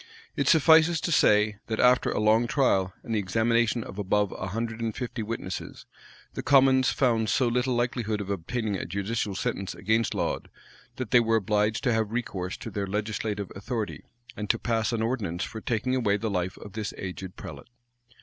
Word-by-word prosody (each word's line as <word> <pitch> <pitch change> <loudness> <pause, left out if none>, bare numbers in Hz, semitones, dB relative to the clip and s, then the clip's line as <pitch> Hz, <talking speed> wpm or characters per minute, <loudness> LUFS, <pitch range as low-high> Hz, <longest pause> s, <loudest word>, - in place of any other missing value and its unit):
It 140 - 0
suffices 160 +1 +6
to 170 - -2
say, 105 -6 +4
that 110 - -2
after 125 0 +4
a - - -1
long 110 +2 +3
trial, 95 -9 +2
and 115 - -4
the 110 - +2
examination 115 +4 +1
of 95 - -9
above 105 0 +1
a 95 - -5
hundred 115 +3 -4
and 115 -2 -2
fifty 125 -2 -4
witnesses, 105 -4 -5 0.5
the - - -4
commons 135 -2 +5
found 115 -5 +1
so 130 - +2
little 125 +1 +1
likelihood 120 -3 -1
of 100 -1 -4
obtaining 105 +4 -2
a - - -4
judicial 100 +1 -2
sentence 110 -3 -3
against 110 +3 0
Laud, - - -2 0.5
that 130 - -5
they 125 - +7
were 115 -1 +2
obliged 105 0 +1
to 125 - +2
have 110 -2 0
recourse 95 -6 -3
to 115 - -7
their 100 0 -3
legislative 105 0 -3
authority, 100 - -4 0.3
and 105 -1 -5
to 115 - +3
pass 115 0 0
an 115 -1 -1
ordinance 105 -7 -2
for 110 - -6
taking 125 +3 -1
away 105 -5 +2
the 110 +1 -3
life 90 0 -2
of 100 - -11
this 110 0 -4
aged 95 0 -6
prelate. - - -9
110 Hz, 190 wpm, -27 LUFS, 100-120 Hz, 0.5 s, they